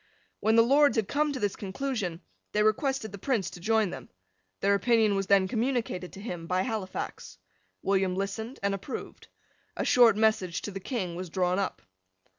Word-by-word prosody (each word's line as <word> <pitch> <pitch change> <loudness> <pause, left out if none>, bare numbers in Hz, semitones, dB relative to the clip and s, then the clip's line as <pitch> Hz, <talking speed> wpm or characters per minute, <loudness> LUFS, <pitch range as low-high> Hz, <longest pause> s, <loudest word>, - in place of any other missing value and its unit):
When 220 +1 +2
the 230 - +7
Lords 280 +4 +4
had 220 -4 +1
come 300 +1 +1
to 270 - -4
this 205 -3 -1
conclusion, 200 -4 -3 0.3
they 210 - +3
requested 220 +1 +1
the 200 - -8
Prince 230 -4 -1
to - - -10
join 215 0 +2
them. 130 -2 -8 0.5
Their 200 0 +3
opinion 220 0 +3
was 195 -1 -1
then 195 -1 +4
communicated 225 -5 -1
to - - -9
him, 175 -6 -6
by 185 +1 +1
Halifax. 215 -5 -5 0.5
William 190 -1 +1
listened 220 +6 -4
and 200 0 +1
approved. 195 +7 -7 0.5
A - - -1
short 235 -4 +6
message 215 -5 +1
to 205 - -4
the 195 - -5
King 190 -5 -3
was 180 0 -5
drawn 180 +2 +1
up. 195 - -3
200 Hz, 180 wpm, -28 LUFS, 185-230 Hz, 0.5 s, the